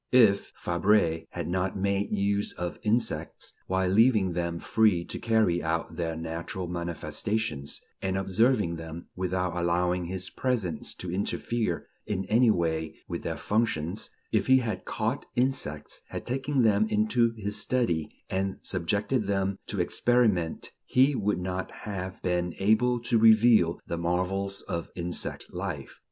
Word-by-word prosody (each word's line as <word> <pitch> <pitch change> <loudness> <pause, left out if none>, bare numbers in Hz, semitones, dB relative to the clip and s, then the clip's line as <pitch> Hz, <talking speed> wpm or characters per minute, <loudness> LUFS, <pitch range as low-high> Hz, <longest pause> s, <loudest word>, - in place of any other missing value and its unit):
If 110 -6 +5
Fabre 85 -2 +2
had 85 - -5
not 95 +2 -1
made 100 +1 0
use 100 0 0
of 90 -1 -4
insects, 115 +3 -1
while 95 0 +1
leaving 105 -2 +4
them 85 -1 -2
free 95 -2 +2
to - - -6
carry 110 -7 +2
out 80 +1 -2
their 80 -2 -2
natural 85 +3 -4
manifestations, 85 -1 -2 0.2
and 95 0 -1
observing 95 -2 +2
them 80 +1 -8
without 90 -1 -1
allowing 90 +1 +1
his 95 +1 -3
presence 115 -10 -2
to 90 - -5
interfere 100 -1 -1 0.2
in 95 -2 -2
any 120 +2 +5
way 80 -4 0
with - - -4
their - - -3
functions; 100 -4 -1 0.2
if - - +1
he 130 0 +7
had 115 -4 -2
caught - - -2
insects, 125 - -1
had - - -6
taken 135 +1 0
them 110 -1 +4
into 115 +2 +2
his 105 0 -3
study, 100 -9 0 0.2
and 95 0 -1
subjected 100 +6 0
them 100 -1 0
to - - -3
experiment, 110 -9 +1
he 135 +3 +4
would 105 -6 0
not 90 +1 -3 0.2
have 95 -3 -5
been 90 -1 0
able 120 +5 +3
to 115 -1 +2
reveal 110 -5 +6
the 85 - -3
marvels 95 +3 -1
of 85 0 -4
insect 85 0 -3
life. - - -5
95 Hz, 140 wpm, -28 LUFS, 85-110 Hz, 0.2 s, he